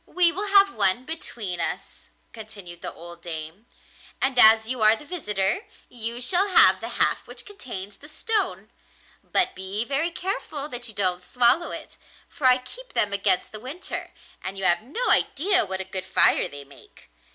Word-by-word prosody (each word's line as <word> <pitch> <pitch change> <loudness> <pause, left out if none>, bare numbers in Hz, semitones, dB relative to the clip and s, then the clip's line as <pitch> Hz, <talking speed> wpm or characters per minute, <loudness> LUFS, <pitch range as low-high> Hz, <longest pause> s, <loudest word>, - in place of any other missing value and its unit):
'We 355 -2 +2
will 405 +4 -3
have 395 0 +6
one 200 +5 +1
between 230 - -5
us,' - - -5 0.2
continued 200 -6 -11
the - - -5
old 170 0 -12
dame; 165 +5 -8 0.5
'and 265 -2 0
as 220 0 +7
you 250 -1 -3
are 215 +1 +6
the 295 - -13
visitor, 285 - -2 0.2
you 235 0 -5
shall 355 +10 +3
have 380 - +6
the - - -4
half - - +1
which - - -8
contains 205 - -8
the 300 - -14
stone; 440 +7 -1 0.5
but 370 - 0
be 190 +4 -4
very 280 +6 +1
careful 335 -5 -3
that 245 -2 -3
you 220 - -9
don't 185 -2 0
swallow 250 - +2
it, - - -9 0.3
for 295 -6 -1
I 255 0 +6
keep - - -9
them 205 -1 +3
against 195 -2 0
the 215 - -7
winter, 270 - -6 0.3
and 190 +1 -5
you 195 - -5
have 175 -1 +3
no 295 - -1
idea 365 +4 +2
what 190 0 -3
a - - -2
good 190 0 -5
fire - - +4
they 145 0 -9
make. 140 - -18
235 Hz, 180 wpm, -24 LUFS, -, 0.5 s, as